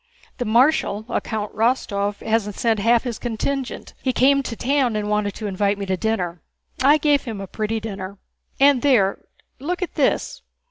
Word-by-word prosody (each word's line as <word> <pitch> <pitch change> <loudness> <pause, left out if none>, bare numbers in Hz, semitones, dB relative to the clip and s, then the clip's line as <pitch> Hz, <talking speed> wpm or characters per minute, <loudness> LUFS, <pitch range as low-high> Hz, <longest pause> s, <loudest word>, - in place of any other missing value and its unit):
"The 245 - -1
marshal, 230 -2 +2
a - - 0
Count 215 -2 -4
Rostóv, 205 -3 0
hasn't 220 -2 0
sent 225 -3 +1
half 230 +3 +3
his 240 -4 -4
contingent. 255 +3 -3
He 260 - +1
came 275 +3 +4
to 245 -3 -5
town 260 -2 +1
and 210 0 -2
wanted 210 -1 0
to 220 - -6
invite 200 0 0
me 200 - -4
to 190 -1 0
dinner—I 220 - 0
gave 295 -2 +2
him 225 -5 -5
a 195 - -5
pretty 215 +3 -2
dinner!... 200 -3 -6 0.4
And 275 -2 +5
there, 230 -9 +3 0.4
look 355 +7 -2
at 360 - -5
this.... - - 0
225 Hz, 175 wpm, -22 LUFS, 205-260 Hz, 0.4 s, And